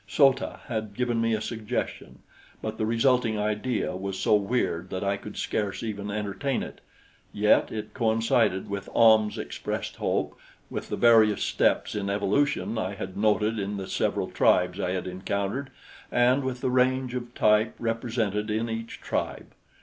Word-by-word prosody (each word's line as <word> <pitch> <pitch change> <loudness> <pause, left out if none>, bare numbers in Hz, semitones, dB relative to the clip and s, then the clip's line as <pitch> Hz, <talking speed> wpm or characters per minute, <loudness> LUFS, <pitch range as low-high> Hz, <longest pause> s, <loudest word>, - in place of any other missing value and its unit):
So 135 +4 +5
ta 135 - -7
had 110 -4 -4
given 120 -1 0
me 115 -1 +2
a 110 - -3
suggestion; 110 -2 -4 0.4
but 110 0 -5
the 110 - 0
resulting 115 -1 +2
idea 105 +1 -1
was 95 0 -4
so - - +2
weird 100 -4 0
that 95 0 -3
I 100 0 +1
could 105 +1 -9
scarce 105 0 -2
even 105 -2 -4
entertain 105 +6 -2
it; - - -9 0.5
yet 105 +1 +3
it 110 -1 -5
coincided 115 -3 +1
with 100 -1 -5
Ahm's 110 -2 +5
expressed - - -4
hope, - - -1 0.4
with - - -5
the - - -1
various 110 -3 +5
steps - - +1
in 100 -1 -2
evolution 110 +4 0
I 100 -1 -3
had 95 -2 -6
noted 110 +1 +1
in 100 +1 -3
the 95 - -4
several - - -1
tribes 90 +1 +3
I 90 -2 -1
had 95 - -3
encountered 100 +8 -3 0.4
and 125 +3 +3
with 130 -1 -3
the 130 - 0
range 130 0 +2
of 120 -1 -5
type 105 +1 +3
represented 115 -2 -1
in 110 +2 -1
each 115 0 -6
tribe. - - -3
110 Hz, 165 wpm, -27 LUFS, 100-120 Hz, 0.5 s, So